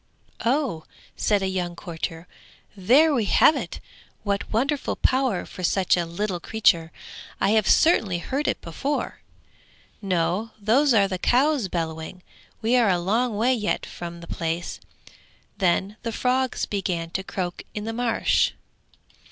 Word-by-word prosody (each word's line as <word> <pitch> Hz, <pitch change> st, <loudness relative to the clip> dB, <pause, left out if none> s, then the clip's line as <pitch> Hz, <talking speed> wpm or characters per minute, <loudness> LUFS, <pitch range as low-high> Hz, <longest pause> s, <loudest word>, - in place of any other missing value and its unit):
'Oh!' 245 Hz, -, 0 dB, 0.3 s
said 205 Hz, -2 st, +1 dB
a -, -, +1 dB
young 180 Hz, -2 st, -2 dB
courtier, 165 Hz, -1 st, -6 dB, 0.5 s
'there 260 Hz, +11 st, +4 dB
we 235 Hz, -6 st, +1 dB
have 300 Hz, -, +5 dB
it. -, -, -5 dB, 0.4 s
What 200 Hz, -1 st, -2 dB
wonderful 275 Hz, +6 st, 0 dB
power 260 Hz, -7 st, +1 dB
for -, -, -10 dB
such 185 Hz, +1 st, +3 dB
a 175 Hz, -2 st, -1 dB
little 180 Hz, +2 st, -3 dB
creature; 170 Hz, -5 st, +2 dB, 0.5 s
I 195 Hz, -, +2 dB
have 220 Hz, -2 st, +3 dB
certainly 220 Hz, -, +4 dB
heard 270 Hz, +12 st, -2 dB
it -, -, 0 dB
before.' 270 Hz, -, -3 dB, 0.8 s
'No, 185 Hz, +3 st, -1 dB
those 240 Hz, +6 st, +3 dB
are 200 Hz, -2 st, +5 dB
the 185 Hz, -1 st, -4 dB
cows 265 Hz, +1 st, +2 dB
bellowing; 165 Hz, +1 st, -4 dB, 0.4 s
we 230 Hz, +3 st, +3 dB
are 235 Hz, -4 st, +4 dB
a 180 Hz, -, +3 dB
long 215 Hz, +6 st, 0 dB
way 245 Hz, +4 st, +3 dB
yet 215 Hz, -4 st, -1 dB
from 170 Hz, 0 st, -8 dB
the 170 Hz, -, -10 dB
place.' 165 Hz, +1 st, -3 dB, 0.8 s
Then 190 Hz, +3 st, +1 dB
the 230 Hz, -, -3 dB
frogs 255 Hz, +2 st, 0 dB
began 175 Hz, -5 st, -3 dB
to 190 Hz, -, -2 dB
croak 180 Hz, -2 st, -4 dB
in 210 Hz, -, -3 dB
the 225 Hz, +1 st, -4 dB
marsh. 240 Hz, 0 st, +1 dB
200 Hz, 145 wpm, -24 LUFS, 175-240 Hz, 0.8 s, have